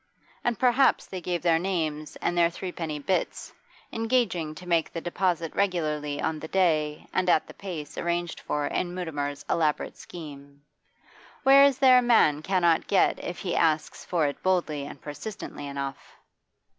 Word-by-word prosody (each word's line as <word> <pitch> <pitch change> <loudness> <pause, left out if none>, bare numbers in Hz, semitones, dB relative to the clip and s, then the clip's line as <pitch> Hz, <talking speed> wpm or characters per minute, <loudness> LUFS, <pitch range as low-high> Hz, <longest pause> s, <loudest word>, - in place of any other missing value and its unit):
And 240 -2 0
perhaps 255 +3 +3
they 185 -2 -7
gave 175 0 -2
their 165 -2 +4
names 160 -5 -2
and 175 - 0
their 170 -1 +4
threepenny 170 -3 -5
bits, 185 +6 -2 0.4
engaging 225 -9 0
to 180 +2 -11
make 170 -2 +1
the 165 - -4
deposit 175 -1 -1
regularly 155 -7 -1
on 160 -1 -1
the 160 - -7
day 155 -5 +1
and 185 -1 +1
at 155 - +4
the - - -12
place 160 -7 -7
arranged 175 0 -2
for 150 -1 -2
in 175 +4 -2
Mutimer's 145 -5 -4
elaborate 155 -3 0
scheme. 145 -4 -11 0.8
What 270 0 +6
is 275 -2 +6
there 260 -2 +7
a - - +2
man 220 -12 +4
cannot 175 -2 +2
get 195 - +2
if 175 - -5
he 180 - -3
asks 160 -2 +1
for 170 -4 0
it 140 - -3
boldly 160 -6 0
and 140 - -10
persistently 145 +1 -7
enough? 140 -1 -6
170 Hz, 160 wpm, -27 LUFS, 150-185 Hz, 0.8 s, there